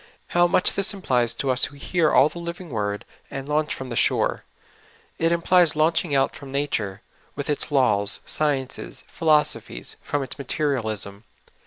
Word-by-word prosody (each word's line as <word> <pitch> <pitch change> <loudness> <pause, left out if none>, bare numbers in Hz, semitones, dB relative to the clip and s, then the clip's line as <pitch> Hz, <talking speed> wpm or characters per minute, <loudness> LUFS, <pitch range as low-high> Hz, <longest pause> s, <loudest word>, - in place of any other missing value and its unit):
How 175 0 +4
much 180 - +2
this 200 +1 +3
implies 125 -11 +1
to 135 - 0
us 125 0 +3
who 145 - -10
will - - -14
hear 165 +1 +1
all 135 - +6
the 165 +3 -8
living 170 -1 -7
word, 105 -2 -2 0.2
and 135 0 -6
launch 150 0 0
trom 130 -1 -7
the - - -3
shore! - - +1 0.7
It 165 0 +2
implies 170 -1 +3
launching 160 0 +1
out 135 - +2
from 140 -2 -10
nature, 110 -9 -2 0.3
with 145 +1 -2
its 145 - -2
laws, 110 -7 +3
sciences, 140 -4 -2
philosophies, 150 - 0
from 145 -1 -2
its 130 - -6
materialism. 110 -8 -2
145 Hz, 165 wpm, -24 LUFS, 125-165 Hz, 0.7 s, all